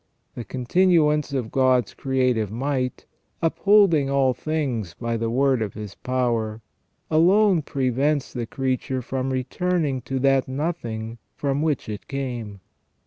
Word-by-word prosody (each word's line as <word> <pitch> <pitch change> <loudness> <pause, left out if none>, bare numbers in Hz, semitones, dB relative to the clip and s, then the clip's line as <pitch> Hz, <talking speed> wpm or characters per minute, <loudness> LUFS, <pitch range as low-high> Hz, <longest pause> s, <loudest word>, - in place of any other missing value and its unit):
The 120 - -6
continuance 150 +3 +2
of 125 -5 -2
God's 130 -4 +2
creative 125 -5 0
might, 130 +1 -2 0.2
" - - -44
upholding 170 -4 +4
all 135 -2 +3
things 125 - -3
by 115 -1 -3
the 115 0 -1
word 130 0 +2
of 105 -3 -3
His 105 -2 -7
power," 115 -4 -1 0.5
alone 185 +3 +4
prevents 135 +1 0
the 120 -3 -4
creature 130 0 -2
from 130 +2 -2
returning 140 +2 -1
to 135 - -1
that 135 0 +2
nothing 120 -6 -4 0.2
from 140 0 -1
which 155 -4 -1
it 105 -1 -6
came. 120 -8 -5
130 Hz, 135 wpm, -24 LUFS, 120-150 Hz, 0.5 s, upholding